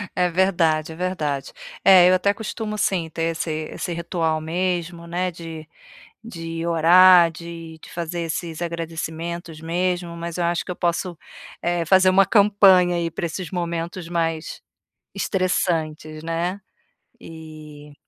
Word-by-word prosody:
É 180 -1 +2
verdade, 165 -4 +1
é - - -11
verdade. 155 -7 -3 0.3
É, 180 -2 +8
eu - - +5
até 200 +2 +2
costumo 215 -1 -5
sim, 175 -5 0
ter 165 0 -4
esse 165 0 -2 0.2
esse 175 - -4
ritual 165 -2 -1
mesmo, 170 0 -2
né, 180 +1 -2
de 165 -2 -9 0.6
de 165 -5 -6
orar, 170 +1 +7
de 165 -1 -9
de - - -12
fazer 170 0 -4
esses 165 0 -4
agradecimentos 165 0 -5
mesmo, 175 +1 -2
mas 170 0 -6
eu 175 - 0
acho 170 0 0
que - - -8
eu 180 - -4
posso, 175 0 -2 0.4
eh, 175 -1 -1
fazer 185 +2 +5
uma 195 +1 +5
campanha 195 -4 +5
aí 170 -1 -1
para 170 - -3
esses 170 0 -6
momentos 170 0 -4
mais 165 -2 -2 0.5
estressantes, 160 -5 -1
né. 170 +4 -2 0.6
E 155 -2 -12
170 Hz, 140 wpm, -22 LUFS, 165-180 Hz, 0.6 s, É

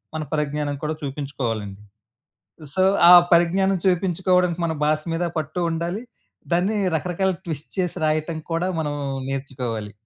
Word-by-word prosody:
మన 155 - -2
పరిజ్ఞానం 150 -1 -1
కూడా 155 +1 -1
చూపించుకోవాలండి. 120 -8 -4 0.9
సో, 185 - +2 0.3
ఆ - - +11 0.2
పరిజ్ఞానం 185 +3 +3
చూపించుకోడం 180 0 +2
మన 160 - -1
భాస 155 0 +2
మీద 170 +2 -1
పట్టూ 155 +3 -3
ఉండాలి, 170 +7 -3 0.5
దాన్ని 195 +5 +1 0.2
రకరకాల 180 +4 0
ట్విస్ట్ 155 -3 -6
చేసి 180 -1 -1
రాయటం 155 +1 0
కూడా 170 +3 0
మనం 145 -1 -2 0.4
నేర్చుకోవాలి. 125 -6 -4
160 Hz, 125 wpm, -23 LUFS, 145-180 Hz, 0.9 s, ఆ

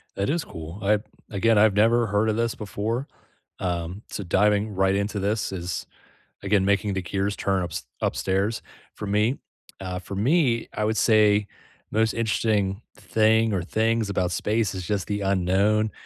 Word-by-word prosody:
That 100 - -1
is 165 +2 0
cool. 80 +4 -9
I've 105 +1 +2 0.3
again, 110 +2 +2
I've 105 0 +5
never 115 +3 +3
heard 105 +2 +1
of 110 - +1
this 115 0 0
before, 110 +6 -3 0.5
um, 90 +1 -3
so 100 - -5
diving 105 +3 +2
right 95 0 +2
into 100 +1 -1
this 105 +2 -1
is, 90 -2 -4 0.6
again, 100 -1 +2
making 100 0 +1
the 95 - -1
gears 100 +3 -1
turn 95 -1 0
ups 85 -3 -5 0.2
upstairs 100 +4 0 0.3
for - - -6
me. 105 +6 +1 0.4
Uh, 90 -1 -4
for 95 +2 -7
me, 120 - +2
I 105 - -2
would 110 +1 0
say 105 -2 +4 0.4
most 110 +1 +2
interesting 110 -3 0
thing 110 0 +2
or 95 - 0
things 110 +3 0
about 90 -2 0
space 110 +2 0
is 90 -2 -5
just 100 -3 -1
the 105 -1 -2
unknown. 100 +3 +2
105 Hz, 165 wpm, -25 LUFS, 95-110 Hz, 0.6 s, I've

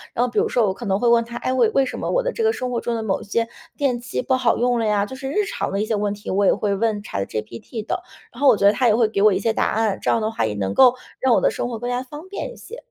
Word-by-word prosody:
然 245 - +2
后 250 - -4
比 - - +1
如 435 +1 +1
说 240 - +2
我 190 - 0
可 235 +3 -7
能 195 0 +1
会 240 - +1
问 235 0 +5
它， 235 +1 -8
哎， 255 - -2
为 245 -4 +3
为 270 +4 +2
什 - - -5
么 - - -3
我 - - +1
的 - - -1
这 455 - -2
个 445 - +4
生 255 - -4
活 235 - -1
中 235 - -2
的 225 - -3
某 200 -3 -1
一 - - -8
些 230 +3 -1 0.3
电 265 -4 0
器 240 +1 -4
不 260 - 0
好 255 -3 +2
用 245 0 +1
了 225 - 0
呀， 205 -1 +2
就 260 - -8
是 265 0 -5
日 415 +9 0
常 - - -3
的 195 - -1
一 - - -2
些 220 - -2
问 205 0 -1
题， 205 - -7
我 200 +1 +2
也 - - +6
会 205 -2 -1
问 210 0 -1
ChatGPT 110 - -5
的。 - - -2 0.3
然 245 - -11
后 285 - +4
我 245 -5 +6
觉 200 - +1
得 200 - +8
它 250 +3 +2
也 215 - +4
会 230 -1 +3
给 215 -2 -1
我 210 -1 +6
一 - - 0
些 225 +3 +1
答 - - +1
案， 215 -3 0
这 - - -1
样 230 - +2
的 215 0 -1
话 225 - -1
也 110 - -2
能 95 -1 -2
够 250 - +6 0.2
让 260 -2 +3
我 - - +3
的 - - +3
生 - - -3
活 235 - -4
更 245 +1 -4
加 245 +1 -1
方 295 +6 -10
便 400 - -5
一 - - -15
些。 470 - -10
230 Hz, 405 characters per minute, -22 LUFS, 205-255 Hz, 0.3 s, 得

